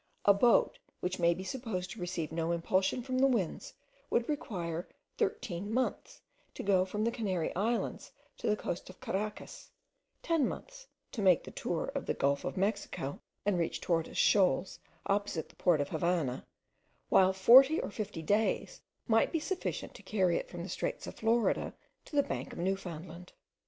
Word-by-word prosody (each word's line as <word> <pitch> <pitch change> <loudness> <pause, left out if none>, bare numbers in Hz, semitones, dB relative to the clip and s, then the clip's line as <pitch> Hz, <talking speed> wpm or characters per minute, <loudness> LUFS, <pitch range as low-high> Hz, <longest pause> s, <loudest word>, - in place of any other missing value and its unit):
A 200 - +8
boat, 235 +4 +3 0.2
which 180 +1 -2
may 170 0 +4
be 185 - -6
supposed 190 -4 -4
to 235 - -8
receive 175 -3 -3
no 165 +1 -1
impulsion 190 +7 +1
from 255 0 -1
the 270 - +6
winds, 225 -10 -1 0.3
would 235 - +1
require 175 - -3 0.3
thirteen 225 - -2
months 260 - -2 0.3
to - - -5
go 190 -2 +3
from 210 +3 -2
the 230 - +2
Canary 190 -8 -2
Islands 225 +5 -1 0.3
to - - -4
the 210 - +3
coast 175 - -4
of 185 - -13
Caracas, 210 +2 -4 0.5
ten 330 -6 +2
months - - -8 0.2
to 220 - -4
make 185 -3 +5
the - - -9
tour - - -2
of - - -4
the - - 0
gulf 140 0 +1
of - - -4
Mexico 195 -8 -2 0.3
and 200 -3 +2
reach 165 -1 -1
Tortoise 165 -1 -1
Shoals 190 -2 +3 0.3
opposite 200 -5 -1
the - - -20
port 175 -4 +3
of 145 - -1
the 160 - -3
Havannah, 165 -7 0 0.6
while 190 0 +6
forty 255 +11 +7
or - - -3
fifty 205 -6 -5
days 220 - 0 0.3
might 225 -1 +3
be 330 - 0
sufficient 370 +4 -3
to - - -12
carry 185 -5 +1
it - - -3
from 175 -1 -6
the 185 - -6
straits - - -3
of - - -7
Florida 225 +1 +1 0.3
to - - -9
the 285 - +5
bank - - -4
of - - -9
Newfoundland. 175 -1 -4
195 Hz, 175 wpm, -32 LUFS, 175-230 Hz, 0.6 s, A